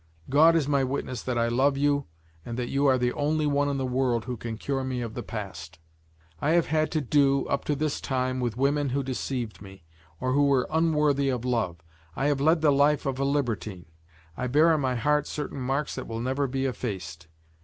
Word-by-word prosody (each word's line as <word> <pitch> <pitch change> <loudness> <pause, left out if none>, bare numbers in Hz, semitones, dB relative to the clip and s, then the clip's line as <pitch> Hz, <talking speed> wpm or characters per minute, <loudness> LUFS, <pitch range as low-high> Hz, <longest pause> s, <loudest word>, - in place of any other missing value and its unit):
God 160 +4 +6
is 155 -4 +2
my 140 -2 +2
witness 130 -2 -3
that 125 -2 -2
I 115 0 +2
love 135 +4 +2
you 145 0 +1 0.4
and 120 0 -6
that 125 -1 -3
you 140 +1 +2
are 130 -1 +4
the 125 0 0
only 150 +1 0
one 145 0 +1
in 140 - -1
the 135 - -1
world 125 -2 0
who 125 -1 -3
can 115 0 -6
cure 135 +3 -2
me 130 -1 -3
of 115 -2 -5
the - - -4
past. 95 -5 -7 0.6
I 155 - +2
have 170 -1 +4
had 155 0 +1
to 155 - +1
do, 140 0 +2
up 140 - -2
to 150 - 0
this 150 +1 -2
time, 130 -1 -1
with 120 -3 -2
women 140 +1 +1
who 140 +2 -1
deceived 125 -4 -4
me, 95 -3 -12 0.4
or 130 - -1
who 145 +1 +4
were 135 -3 +3
unworthy 150 -4 +2
of 125 -2 -2
love. 95 -10 -1 0.3
I 135 - -1
have 140 -2 0
led 160 +2 +3
the 155 -2 +4
life 145 +1 +3
of 135 -1 -2
a - - +1
libertine; 115 -10 -2 0.5
I 125 - -2
bear 155 +6 +4
on 155 - +1
my 130 -2 0
heart 150 +4 +1
certain 145 -2 -5
marks 135 +4 -1
that - - -6
will 115 0 -4
never 135 +4 -1
be 135 +1 -2
effaced. 90 -10 -5
135 Hz, 220 wpm, -27 LUFS, 120-145 Hz, 0.6 s, God